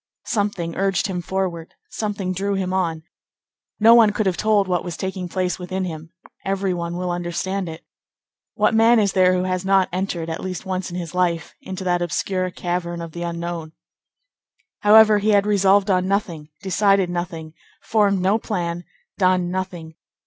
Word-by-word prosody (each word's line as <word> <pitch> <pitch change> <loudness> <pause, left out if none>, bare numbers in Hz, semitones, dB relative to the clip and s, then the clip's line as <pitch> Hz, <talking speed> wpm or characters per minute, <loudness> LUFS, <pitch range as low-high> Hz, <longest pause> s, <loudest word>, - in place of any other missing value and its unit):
Something 200 -6 -2
urged 195 -1 +1
him 185 -4 -2
forward; 175 -2 -3 0.2
something 200 -4 -3
drew 200 +2 -1
him 185 -1 -2
on. 165 -4 -1 0.8
No 225 +2 +7
one 230 -2 +7
could 210 +1 -1
have 185 -2 +1
told 210 -1 +2
what 180 -1 0
was 175 -3 -6
taking 190 -1 -4
place 185 +1 -1
within 185 +1 -3
him; 160 -1 -7 0.3
every 195 -1 -1
one 170 0 -4
will 180 0 -2
understand 175 +2 -3
it. 160 0 -10 0.7
What - - +2
man 225 +2 +5
is 205 -3 +2
there 185 -1 +4
who 180 - 0
has 185 0 -1
not 190 -1 +3
entered, 180 -3 -2
at 160 - -4
least 185 +1 -5
once 185 -1 -3
in 175 - -6
his 170 -2 -6
life, 175 -2 0
into 190 0 -6
that 175 -1 +1
obscure 185 +2 -1
cavern 175 -1 -3
of 165 -1 -7
the 170 - -7
unknown? 170 -1 -4 1.1
However, 215 0 +7
he 210 +2 0
had 200 0 +4
resolved 200 -1 +3
on 185 0 +2
nothing, 180 -7 -2
decided 195 0 +3
nothing, 170 -3 -5 0.3
formed 200 -3 +2
no 195 +4 +2
plan, 175 -5 -3 0.3
done 185 -2 +2
nothing. 180 -3 -5
185 Hz, 170 wpm, -22 LUFS, 175-195 Hz, 1.1 s, No